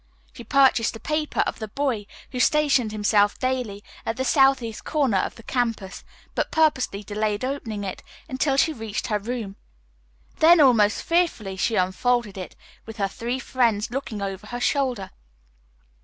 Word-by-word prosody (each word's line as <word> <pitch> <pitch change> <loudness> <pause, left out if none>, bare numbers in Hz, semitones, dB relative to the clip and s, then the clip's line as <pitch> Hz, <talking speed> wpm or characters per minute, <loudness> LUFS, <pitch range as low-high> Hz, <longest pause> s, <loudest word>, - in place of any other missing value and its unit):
She 240 - -10
purchased 255 -2 +3
a - - -8
paper 305 +2 -1
of - - -2
the 220 - -4
boy 235 -3 -2 0.2
who 250 - -4
stationed 280 -5 +3
himself 205 -1 +2
daily 250 -6 -2 0.2
at 225 - -3
the 260 - -1
southeast 270 -5 +2
corner 270 -11 +1
of - - -2
the 230 - -13
campus, 230 -7 -2 0.3
but - - -1
purposely 265 -10 +1
delayed 210 +2 -2
opening 230 -6 -4
it 190 -2 -5 0.3
until 270 +1 0
she 315 +3 +3
reached 220 -5 -4
her 210 -1 +1
room. 215 -2 -5 0.8
Then 335 +2 +7
almost 230 -7 +4
fearfully 330 - 0
she 220 +4 0
unfolded 210 +4 +1
it, 185 -2 -7 0.3
with 225 0 -9
her 200 -2 +1
three 235 +5 -4
friends 235 -5 0
looking 235 -6 -4
over 195 +1 -5
her 245 +2 -5
shoulder. 250 -7 0
230 Hz, 155 wpm, -24 LUFS, 205-265 Hz, 0.8 s, Then